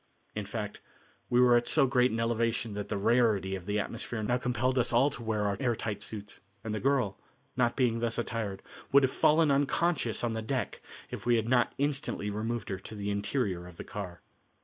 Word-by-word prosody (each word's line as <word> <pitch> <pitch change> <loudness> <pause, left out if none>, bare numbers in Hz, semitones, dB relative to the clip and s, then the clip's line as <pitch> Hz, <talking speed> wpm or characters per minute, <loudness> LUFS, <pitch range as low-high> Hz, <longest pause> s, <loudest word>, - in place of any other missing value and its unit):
In 105 -1 -4
fact, 105 0 -5 0.5
we 120 - +3
were 125 -1 +6
at 120 0 +2
so - - +5
great 125 -1 +3
an 115 - -2
elevation 115 -1 0
that 100 0 -5
the - - -1
rarity 105 -3 +2
of 95 -1 -5
the 105 +1 +1
atmosphere 110 +2 -4
now 120 +3 +1
compelled 125 +1 0
us 125 - +2
all 130 +5 +4
to 125 - -7
wear 110 -2 -1
our 100 -1 0
air 120 -4 +1
tight 105 -2 -4
suits, 105 -1 -7 0.2
and 110 - -3
the 110 - -1
girl, 130 -7 +1 0.4
not 120 -2 +2
being 120 -4 +2
thus 115 -1 -1
attired, 110 -4 -3 0.3
would 140 0 +6
have 130 - +2
fallen 155 0 +4
unconscious 140 -3 +1
on 120 -1 0
the 110 - -2
deck 130 +3 -3 0.3
if - - -6
we 120 - +5
had 110 -1 0
not 120 0 +2
instantly 140 -7 -1
removed 110 +2 -3
her 95 -1 -3
to 110 - -10
the 100 0 -3
interior 100 -3 -1
of 90 -2 -13
the - - -6
car. 90 -4 -7
115 Hz, 215 wpm, -30 LUFS, 105-125 Hz, 0.5 s, were